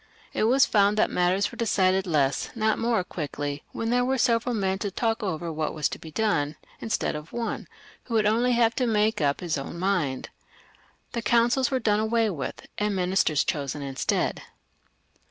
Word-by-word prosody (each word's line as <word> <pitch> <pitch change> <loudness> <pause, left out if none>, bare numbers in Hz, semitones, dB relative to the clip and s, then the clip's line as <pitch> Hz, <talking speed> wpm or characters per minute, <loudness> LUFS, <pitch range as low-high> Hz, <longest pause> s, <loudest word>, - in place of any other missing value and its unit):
It - - +1
was 260 +4 +5
found 205 0 +3
that 215 - +2
matters 180 +3 +1
were - - -3
settled 190 -3 +2
less, 140 -5 +1
not 220 -1 +1
more, 230 -4 +1
quickly 145 -4 -5
when 230 0 -2
there 245 0 +3
were 265 +1 +1
several 235 0 +2
men 190 -2 0
to 205 - -2
talk 225 +3 -1
over 170 -4 -3
what 155 0 -2
was 155 - +1
to - - -6
be 160 - -10
done, 155 -5 0 0.2
instead 220 - -1
of 150 +1 -8
one, 235 -1 -3 0.4
who 235 - -3
would 215 -1 +3
only 235 +4 +3
have 235 -1 +4
had - - -31
to 255 -3 +1
make 215 -3 +2
up 140 -1 +1
his 165 -5 -1
own 135 +5 -6
mind. 170 -8 -1 0.8
The 235 - -3
coimcils 240 +2 +3
were 265 - +1
done 210 -3 +2
away 220 0 +1
with, 145 -7 -5
and 210 -1 0
ministers 180 -4 +2
chosen 145 -2 -3
instead. 135 -1 -1
205 Hz, 190 wpm, -26 LUFS, 160-230 Hz, 0.8 s, was